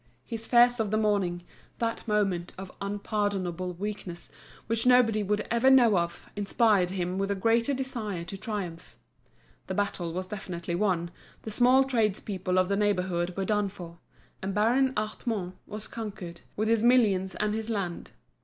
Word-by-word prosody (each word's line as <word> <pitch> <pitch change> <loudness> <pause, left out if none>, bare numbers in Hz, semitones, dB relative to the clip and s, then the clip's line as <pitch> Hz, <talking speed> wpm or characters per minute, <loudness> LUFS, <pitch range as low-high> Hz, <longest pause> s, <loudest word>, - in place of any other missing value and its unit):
His 225 -1 -6
fears 245 0 +5
of 220 -2 0
the 215 - +1
morning, 200 -5 +1 0.3
that 230 0 -2
moment 195 -5 0
of 190 0 -8
unpardonable 200 -3 -2
weakness 190 -2 -6 0.3
which 225 +1 +1
nobody 240 -4 +5
would 210 +1 0
ever 235 +3 +4
know 245 -5 +6
of, 170 -1 -2
inspired 205 -2 +2
him 185 0 -2
with 195 0 -1
a 200 - +1
greater 230 +6 +2
desire 235 -9 -3
to 175 +3 -7
triumph. 195 -5 -6 0.7
The - - -3
battle 190 -4 -1
was 185 +2 -3
definitely 180 -3 -5
won, 175 -2 0 0.3
the 220 - -5
small 250 +4 +5
tradespeople 210 -7 0
of 185 0 +4
the 200 - +1
neighbourhood 185 -3 0
were 195 - 0
done 210 -1 +1
for, 170 -3 -10 0.4
and 190 0 -3
Baron 250 +5 +3
Hartmann 215 -3 -2
was 210 +1 -7
conquered, 195 -6 -7
with 215 +1 0
his 225 -1 +3
millions 215 -6 +3
and 210 0 0
his 220 +1 -3
land. 195 -6 -3
205 Hz, 160 wpm, -28 LUFS, 185-225 Hz, 0.7 s, know